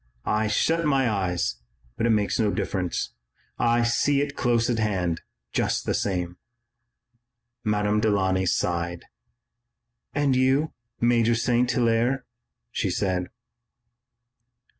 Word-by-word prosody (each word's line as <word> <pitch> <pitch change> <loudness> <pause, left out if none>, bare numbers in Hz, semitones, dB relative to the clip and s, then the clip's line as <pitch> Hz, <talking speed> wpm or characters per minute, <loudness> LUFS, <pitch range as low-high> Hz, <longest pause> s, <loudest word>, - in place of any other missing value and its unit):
I 110 0 +1
shut 165 +10 +1
my 135 -4 +2
eyes, 90 - -1 0.4
but 115 - 0
it - - +1
makes 105 -1 +1
no 110 -2 +3
difference. 95 -3 -2 0.5
I 120 0 +3
see 140 +4 +2
it 140 0 -2
close 120 -2 +2
at 120 -2 0
hand, 90 -6 0 0.3
just - - 0
the - - 0
same." 90 -2 -2 1.3
Madame 105 -1 +1
Delaunay 95 -3 +2
sighed. 85 0 -1 1.1
"And 145 -2 +2
you, 135 +4 +2 0.3
Major 120 -1 +3
St. 120 +1 +2
Hilaire?" 120 +2 +1 0.5
she - - -1
said. 90 -2 -1
115 Hz, 115 wpm, -25 LUFS, 95-125 Hz, 1.3 s, no